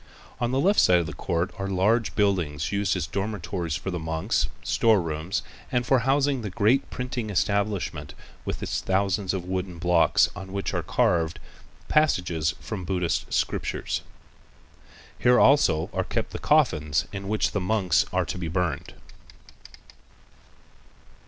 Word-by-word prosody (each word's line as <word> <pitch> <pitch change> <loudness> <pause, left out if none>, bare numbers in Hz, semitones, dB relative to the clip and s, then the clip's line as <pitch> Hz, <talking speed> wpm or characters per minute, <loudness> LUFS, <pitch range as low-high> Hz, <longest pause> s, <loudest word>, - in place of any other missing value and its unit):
On 120 - 0
the 130 +2 0
left 195 +8 +3
side 90 - +6
of 85 - 0
the 80 - -6
court 85 0 -2
are 95 - -2
large 105 +4 +1
buildings 85 -8 0
used 100 0 +1
as - - -2
dormitories 95 -5 -3
far 95 - -4
the 90 - -3
monks, 80 0 -1 0.2
storerooms, 85 -6 +1 0.3
and 125 -1 +1
for 135 0 +4
housing 135 +1 +1
the 105 - -4
great 110 +8 +2
printing 125 -3 -4
establishment 100 -7 -1 0.3
with - - -4
its - - -2
thousands 95 0 0
of 95 -2 -3
wooden 90 -1 -3
blocks 85 -2 +4
on 95 -1 -8
which 100 0 -3
are - - 0
carved 85 -1 +1 0.5
passages 90 - +1
from 105 - -5
the 90 - -7
Buddhist 90 -3 -1
scriptures. - - -1 1.2
Here 125 0 +5
also 135 - +4
are - - 0
kept - - -3
the - - -5
coffins 75 +2 +2
in 100 -1 -5
which 105 +1 0
the 100 - -1
monks 90 -3 +2
are 90 0 +1
to 80 +4 -5
be 85 - -3
burned. 90 0 -2
95 Hz, 150 wpm, -26 LUFS, 85-110 Hz, 1.2 s, side